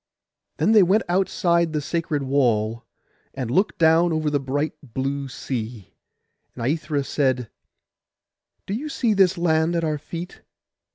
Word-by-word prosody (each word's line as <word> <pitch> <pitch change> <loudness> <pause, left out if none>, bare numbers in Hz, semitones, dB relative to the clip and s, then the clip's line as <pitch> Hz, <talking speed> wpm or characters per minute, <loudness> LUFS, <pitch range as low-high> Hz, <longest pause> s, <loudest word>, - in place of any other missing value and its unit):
Then - - +2
they 220 -2 +7
went 195 +5 +3
outside 170 -2 +1
the 150 - 0
sacred 150 -1 -2
wall, 115 -5 +1 0.5
and 125 -4 -3
looked 190 +10 +1
down 165 +1 +4
over 155 -2 0
the 145 - +1
bright 140 +3 -2
blue 135 +2 -3
sea; 120 -6 -6 0.6
and 115 - -4
Aithra 150 0 -1
said— 130 -5 0 1.1
'Do 195 - -4
you 285 +8 -3
see 235 -6 +1
this 190 -2 +3
land 165 0 +2
at 165 - 0
our 155 -2 -1
feet? 170 +4 -8
155 Hz, 140 wpm, -23 LUFS, 135-170 Hz, 1.1 s, they